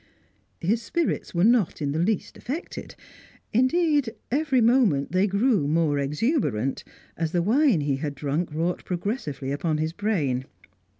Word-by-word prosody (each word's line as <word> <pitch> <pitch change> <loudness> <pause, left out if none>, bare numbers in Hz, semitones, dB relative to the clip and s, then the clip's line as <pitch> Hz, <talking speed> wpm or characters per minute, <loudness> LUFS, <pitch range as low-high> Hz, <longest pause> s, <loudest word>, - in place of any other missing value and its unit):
His 215 +7 +1
spirits 335 - -2
were 170 - +2
not 225 -5 +3
in 145 -2 -1
the 155 - -1
least 200 +5 -1
affected; 295 +8 -6 0.6
indeed, 290 +2 +3 0.2
every 280 -1 +2
moment 225 - +3
they 185 +3 +3
grew 200 - +2
more 155 -2 +2
exuberant, 140 - 0 0.3
as 165 -1 -2
the 175 -1 +2
wine 240 - +3
he 140 -2 0
had 145 0 -4
drunk 150 +4 -2
wrought 165 +4 -2
progressively 175 - -3
upon 155 +2 -1
his 155 +1 -2
brain. 155 - -1
175 Hz, 140 wpm, -25 LUFS, 150-240 Hz, 0.6 s, not